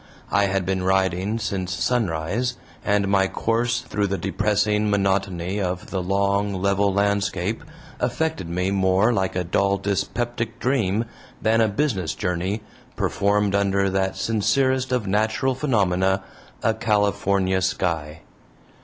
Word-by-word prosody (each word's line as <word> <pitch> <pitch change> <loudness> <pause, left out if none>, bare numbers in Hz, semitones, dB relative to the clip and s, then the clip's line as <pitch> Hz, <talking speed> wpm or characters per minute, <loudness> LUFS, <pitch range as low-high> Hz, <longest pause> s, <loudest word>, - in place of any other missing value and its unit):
I 100 - +3
had 95 -1 0
been 95 0 0
riding 95 +2 +1
since 95 -4 -2
sunrise, 115 +2 0 0.3
and 100 -1 +2
my 95 -1 +3
course 115 +4 0
through 105 -1 -1
the 100 0 -1
depressing 105 +1 +1
monotony 95 -1 0
of 90 -1 -3
the 95 - -1
long 100 +2 +1
level 100 +1 +2
landscape 100 0 0 0.4
affected 130 - -1
me 90 +2 -1
more 95 +4 +3
like 95 -3 -1
a 90 - 0
dull 100 +3 +1
dyspeptic 115 +4 -2
dream 115 -4 +1 0.3
than 110 +1 +3
a 110 - +4
business 100 - -1
journey, 95 +3 -2 0.3
performed 100 0 +1
under 100 -1 +2
that 95 0 0
sincerest 130 +4 +1
of 125 -4 0
natural 110 +6 +1
phenomena 95 -8 +1 0.4
a 110 - +3
California 100 -3 +1
sky. 80 -4 -1
100 Hz, 125 wpm, -23 LUFS, 95-110 Hz, 0.4 s, a